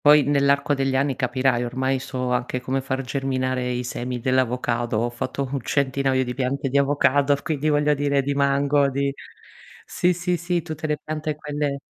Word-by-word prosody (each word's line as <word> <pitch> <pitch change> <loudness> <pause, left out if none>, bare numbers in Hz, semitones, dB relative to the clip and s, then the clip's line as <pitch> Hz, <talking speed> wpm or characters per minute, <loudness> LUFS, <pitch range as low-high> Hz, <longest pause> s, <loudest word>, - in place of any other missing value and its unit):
Poi 150 0 +8
nell'arco 140 +1 +2
degli 135 -1 0
anni 135 0 +1
capirai, 130 -1 +1
ormai 130 +2 -1
so 125 -1 -3
anche 125 0 -1
come 130 +1 -2
far 130 0 -2
germinare 130 -1 -1
i 125 0 -2
semi 125 0 -4
dell'avocado. 120 -2 0
Ho 120 +2 0
fatto 130 +3 -3
un 140 -2 -2
centinaio 135 0 +1
di 125 -1 -4
piante 135 +1 -1
di 140 +2 +3
avocado, 140 0 +3
quindi 155 -1 -1
voglio 150 0 +3
dire 140 -1 +1
di 140 +1 -1
mango, 140 0 +2
di 140 +1 -1 0.7
sì, 180 - +1
sì, 180 +1 -1
sì, 170 0 -1
tutte 160 -2 -5
le 150 -1 0
piante, 155 0 -3
quelle 145 -1 -3
135 Hz, 175 wpm, -23 LUFS, 130-145 Hz, 0.7 s, Poi